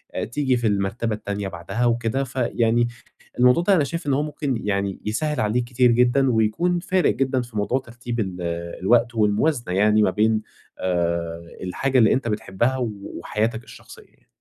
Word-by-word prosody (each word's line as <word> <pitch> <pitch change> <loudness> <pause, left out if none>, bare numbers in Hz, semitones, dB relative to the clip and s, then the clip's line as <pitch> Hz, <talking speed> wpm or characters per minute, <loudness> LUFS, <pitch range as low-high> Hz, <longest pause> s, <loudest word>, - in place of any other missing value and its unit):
آآ - - -1
تيجي 130 +2 0
في 120 - 0
المرتبة 105 +3 -1
التانية 100 -1 -4
بعدها 95 +7 -3
وكده، 120 +3 0
فيعني 120 -2 +1 0.5
الموضوع 125 +7 +5
ده 195 +2 +4
أنا 155 - +3
شايف 165 +1 -4
إن 140 - +2
هو 145 +3 +1
ممكن 145 -4 -2
يعني 100 -1 -1
يسهِّل 150 +7 -1
عليك 115 +2 +1
كتير 125 0 +3
جدًا 125 +3 +3
ويكون 120 +11 +1
فارق 185 0 +1
جدًا 130 -1 0
في 120 -3 -8
موضوع 115 +6 +1
ترتيب 120 -1 -6
ال 95 -3 -3 0.4
الوقت 115 +4 +3
والموازنة 110 - +1
يعني 105 +2 +4
ما 105 - +4
بين 110 +2 +2 0.4
آآ 85 -2 -2
الحاجة 130 +9 0
اللي 110 - +5
أنت 130 -2 -1
بتحبّها 110 +4 -1
و 125 -3 -1 0.3
وحياتك 110 +2 -2
الشخصية - - -14
يعني. - - -31
120 Hz, 170 wpm, -23 LUFS, 105-130 Hz, 0.5 s, الموضوع